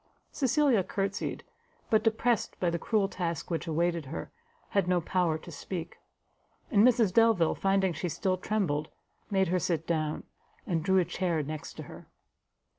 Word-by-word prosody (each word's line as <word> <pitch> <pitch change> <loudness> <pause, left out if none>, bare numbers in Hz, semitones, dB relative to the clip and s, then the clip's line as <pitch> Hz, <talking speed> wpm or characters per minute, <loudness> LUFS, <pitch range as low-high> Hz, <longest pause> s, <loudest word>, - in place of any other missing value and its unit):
Cecilia 265 -5 +2
courtsied; 195 +2 -3 0.5
but 220 - +5
depressed 225 0 0
by 175 -2 +1
the 170 - -2
cruel 210 +2 +1
task 170 -4 -4
which 165 0 -2
awaited 170 0 0
her, - - -6 0.4
had 200 -4 +1
no 180 -1 +3
power 170 -1 0
to 170 - -11
speak; 170 +2 -6 0.7
and 205 -4 +5
Mrs 230 -6 +4
Delvile, 225 -7 +4
finding 195 -2 +1
she 170 +3 -3
still 185 +3 0
trembled, 175 -7 -1 0.4
made 190 -3 +2
her 180 +1 +2
sit 165 -2 -1
down, 155 -2 -1 0.4
and 165 -3 0
drew 190 +2 +3
a 180 - +4
chair 175 -3 -1
next 155 +1 -6
to - - -7
her. - - -12
180 Hz, 160 wpm, -29 LUFS, 165-200 Hz, 0.7 s, but